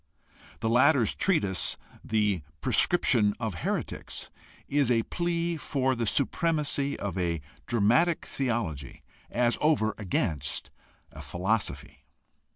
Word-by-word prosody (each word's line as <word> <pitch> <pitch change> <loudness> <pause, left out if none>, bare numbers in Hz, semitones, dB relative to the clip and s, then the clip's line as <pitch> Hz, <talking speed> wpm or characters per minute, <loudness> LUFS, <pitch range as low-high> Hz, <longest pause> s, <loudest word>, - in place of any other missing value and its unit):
The 115 - 0
latter's 125 0 +4
treatise, 100 - +1 0.3
The 105 -5 +1 0.2
Prescription 105 - +3
of 110 -4 -2
Heretics, - - -4 0.4
is 140 -3 +2
a 115 -2 +3
plea 170 +1 -1
for 130 -3 0
the 120 -2 -2
siipremacy 145 +2 0
of 95 -2 -4
a 85 -2 0 0.3
dramatic 120 +11 +2
theology 105 - -3 0.3
as 120 0 +1
over 135 -9 +2
against 80 -7 -2 0.4
a - - -10
philosophy. 100 +5 -2
120 Hz, 105 wpm, -28 LUFS, 100-145 Hz, 0.4 s, latter's